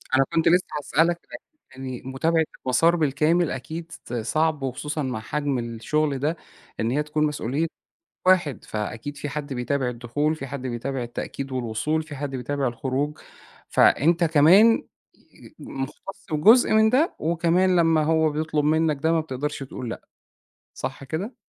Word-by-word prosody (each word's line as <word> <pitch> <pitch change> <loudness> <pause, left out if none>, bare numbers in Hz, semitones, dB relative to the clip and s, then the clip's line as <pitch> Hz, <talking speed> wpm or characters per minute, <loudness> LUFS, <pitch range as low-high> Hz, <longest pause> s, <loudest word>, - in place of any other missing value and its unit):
أنا 135 - +5
كنت 165 - +2
لسّه 180 +2 +4
هاسألك 165 +4 +1 0.6
عن 135 - -9
يعني 130 -2 -5
متابعة 160 +5 +1 0.2
المسار 165 +7 +4
بالكامل 155 +2 +2
أكيد 160 +6 -6
ص 125 - -10
صعب 150 +6 0
وخصوصًا 150 +3 -3
مع 125 -4 -3
حجم 140 +2 -2
الشُغل 130 +5 -1
ده، 155 +4 -1 0.4
إن 115 +2 0
هي 150 +3 +1
تكون 150 0 -1
مسؤولية 150 +2 -1 0.6
واحد، 175 -8 +3
فأكيد 110 +7 -5
في 145 - -5
حد 145 -1 -5
بيتابع 125 +1 -1
الدخول، 125 +6 -1
في 140 -3 -7
حد 140 0 -6
بيتابع 125 +2 -3
التأكيد 130 +3 -5
والوصول، 130 +6 -1
في 150 -2 -9
حد 145 0 -4
بيتابع 135 +2 -2
الخروج، 135 +5 -2 0.5
فأنت 170 +5 +4
كمان 170 +9 +6 0.3
ي 310 - -19
مُختّص 135 +8 -7
وجزء 220 +13 +5
من 220 0 +5
ده 290 +7 +2
وكمان 170 +3 +2
لمّا 165 -2 +4
هو 160 0 +3
بيطلب 155 0 -1
منّك 155 0 +2
ده، 160 +1 +3
ما 165 - +3
بتقدرش 145 -1 -4
تقول 125 -2 -6
لأ، - - -7 0.7
صح 140 - -5
كده؟ 175 - -4
150 Hz, 155 wpm, -24 LUFS, 130-160 Hz, 0.7 s, كمان